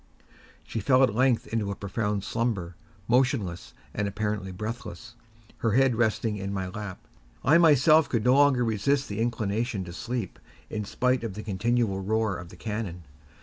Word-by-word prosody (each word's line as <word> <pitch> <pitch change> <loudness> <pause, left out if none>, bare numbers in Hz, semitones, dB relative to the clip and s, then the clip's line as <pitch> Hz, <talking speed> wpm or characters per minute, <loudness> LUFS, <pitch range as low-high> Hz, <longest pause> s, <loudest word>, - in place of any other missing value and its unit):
She 115 - -4
fell 130 +5 +4
at 125 -6 +3
length 125 0 +2
into 110 -3 -1
a 100 - -3
profound 105 0 -2
slumber, 100 -6 -2 0.3
motionless 120 -8 0 0.2
and 105 - -1
apparently 105 -1 -3
breathless, 110 +1 -6 0.5
her 115 -3 +1
head 135 0 +4
resting 110 -1 0
in 100 0 -4
my 95 -2 -3
lap. 100 -1 -6 0.5
I 160 +5 +6
myself 155 -1 +5
could 115 -4 0
no 125 - +5
longer 140 -3 +4
resist 135 +6 +1
the 100 +1 -4
inclination 115 -2 -1
to 85 -1 -8
sleep, 120 -1 -4 0.3
in 105 -1 -3
spite 125 +4 0
of 110 -5 -4
the 110 - -6
continual 105 0 0
roar 110 0 0
of 85 -1 -9
the - - -13
cannon. 105 -6 -4
110 Hz, 165 wpm, -27 LUFS, 100-125 Hz, 0.5 s, I